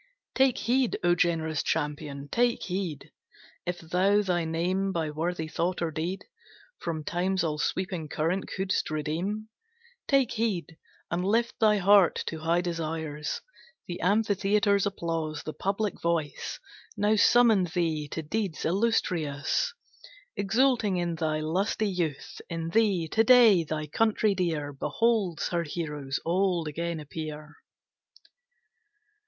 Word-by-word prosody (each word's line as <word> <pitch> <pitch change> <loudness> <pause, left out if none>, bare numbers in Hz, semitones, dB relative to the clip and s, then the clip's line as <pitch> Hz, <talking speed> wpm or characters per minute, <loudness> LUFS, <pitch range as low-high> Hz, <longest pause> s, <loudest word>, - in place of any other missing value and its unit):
Take 265 -2 +3
heed, 255 0 +1
O 175 0 +4
generous 165 -3 +1
champion, 145 -1 -3
take 240 0 +2
heed, 180 -6 -4 0.6
If 175 0 -1
thou 185 +5 +2
thy 175 -3 0
name 180 +4 0
by 160 -4 -2
worthy 160 +1 -2
thought 175 +3 -1
or 170 -2 -1
deed, 170 +5 -3 0.5
From 160 -2 -3
Time's 185 +3 0
all 150 -2 -1
sweeping 180 -2 -2
current 170 +7 -1
couldst 190 +1 -1
redeem; 170 +8 -3 0.6
Take 275 -4 +3
heed, 205 -7 -2 0.4
and 175 +1 0
lift 230 +5 +1
thy 215 -2 +4
heart 200 -1 +5
to 160 - -4
high 165 +2 +1
desires! 160 -3 -3 0.5
The 175 - -5
amphitheatre's 200 0 +2
applause, 165 -5 -3
the 155 - -5
public 200 +1 -2
voice, 170 -3 -2 0.4
Now 205 +1 +3
summon 225 -3 +5
thee 160 -3 -1
to 160 +2 -5
deeds 190 +1 -2
illustrious; 180 - 0 0.6
Exulting 220 -1 +2
in 175 -1 -1
thy 155 -1 -1
lusty 190 +7 0
youth. 165 -6 -3
In 165 -1 -3
thee, 195 -4 +2
to 225 - +3
day, 225 -7 +7
thy 155 -1 -3
country 215 +6 +2
dear 160 -6 -1
Beholds 205 +2 0
her 170 -1 0
heroes 150 -4 -4
old 175 -1 +1
again 170 +2 -3
appear. 155 0 -7
175 Hz, 125 wpm, -28 LUFS, 160-200 Hz, 0.6 s, day